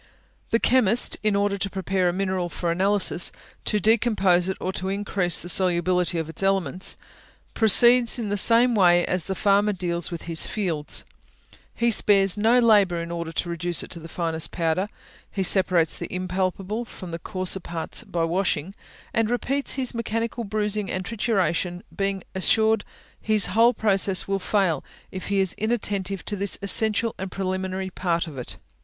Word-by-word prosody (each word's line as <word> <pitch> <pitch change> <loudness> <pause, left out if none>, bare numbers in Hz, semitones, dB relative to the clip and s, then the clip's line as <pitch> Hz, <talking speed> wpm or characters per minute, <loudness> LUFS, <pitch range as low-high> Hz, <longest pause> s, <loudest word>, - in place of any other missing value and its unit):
The 230 - +3
chemist, 240 -2 +2
in 215 -1 +1
order 200 0 0
to 195 - -1
prepare 190 -1 -1
a - - +1
mineral 185 -1 -2
for 170 0 -3
analysis, 190 0 +2 0.3
to 210 - +1
decompose 200 -4 +2
it, 190 - -3
or 185 - -3
to 190 0 -3
increase 195 -3 0
the - - -7
solubility 180 -1 +1
of 160 -1 -2
its 160 - -5
elements, 190 -3 +1 0.6
proceeds 235 +3 +6
in 225 -4 -3
the 205 - 0
same 235 +4 +5
way 175 -4 +4
as 180 -2 0
the 190 - -3
farmer 205 +2 +2
deals 175 -2 -3
with 170 -2 -7
his 165 -1 0
fields 170 -8 -2 0.7
he 235 0 +1
spares 195 -3 +4
no 225 +4 +3
labour 205 -7 +4
in 170 0 -6
order 170 -1 -4
to 175 - -2
reduce 170 +1 -1
it - - -11
to 170 - -1
the 165 0 -11
finest 165 -1 -2
powder; 170 +4 -1 0.4
he 195 - -2
separates 180 -4 +2
the - - -6
impalpable 185 +4 -2
from 185 -6 -10
the 165 - -5
coarser 185 0 -1
parts 170 -2 -5
by 170 -1 -2
washing, 170 0 -1 0.4
and 225 -1 +1
repeats 270 +3 -1
his 260 -2 -2
mechanical 230 +1 -3
bruising 210 -1 -2
and 185 0 -3
trituration, 185 -4 -1
being 195 -2 -2
assured 220 +3 +3 0.4
his 215 -2 +2
whole 230 +3 +5
process 195 -4 +1
will 195 0 -1
fail 185 -6 0 0.3
if 185 - -6
he 200 -1 0
is 190 -2 +1
inattentive 200 -4 -2
to 205 - -2
this 200 -3 -2
essential 220 +2 +2
and 190 0 -4
preliminary 190 0 -3
part 170 -2 -1
of 155 -4 -10
it. 125 -2 -7
190 Hz, 170 wpm, -24 LUFS, 175-210 Hz, 0.7 s, proceeds